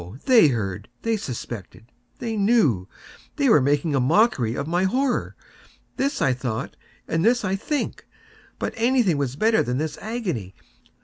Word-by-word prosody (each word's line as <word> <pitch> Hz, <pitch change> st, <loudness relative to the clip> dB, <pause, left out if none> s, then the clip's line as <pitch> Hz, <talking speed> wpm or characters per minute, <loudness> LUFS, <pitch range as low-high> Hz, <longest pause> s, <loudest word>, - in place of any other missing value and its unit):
They 240 Hz, -, +7 dB
heard!—they 110 Hz, -, -3 dB
suspected!—they 120 Hz, -, -7 dB
knew!—they 205 Hz, -, 0 dB
were 150 Hz, -, +6 dB
making 145 Hz, +3 st, +1 dB
a 135 Hz, -, +2 dB
mockery 130 Hz, -, +2 dB
of 140 Hz, -, -3 dB
my 175 Hz, +4 st, +1 dB
horror!—this 270 Hz, +3 st, -3 dB
I 135 Hz, -, +3 dB
thought, 125 Hz, -3 st, -4 dB, 0.3 s
and 165 Hz, +1 st, 0 dB
this 235 Hz, +1 st, +3 dB
I 190 Hz, 0 st, 0 dB
think. 290 Hz, +9 st, -3 dB, 0.5 s
But -, -, -3 dB
anything 230 Hz, -, +2 dB
was 135 Hz, -2 st, -2 dB
better 220 Hz, +7 st, +3 dB
than 125 Hz, +1 st, -1 dB
this 155 Hz, +2 st, -3 dB
agony! 180 Hz, -, -4 dB
165 Hz, 130 wpm, -23 LUFS, -, 0.5 s, They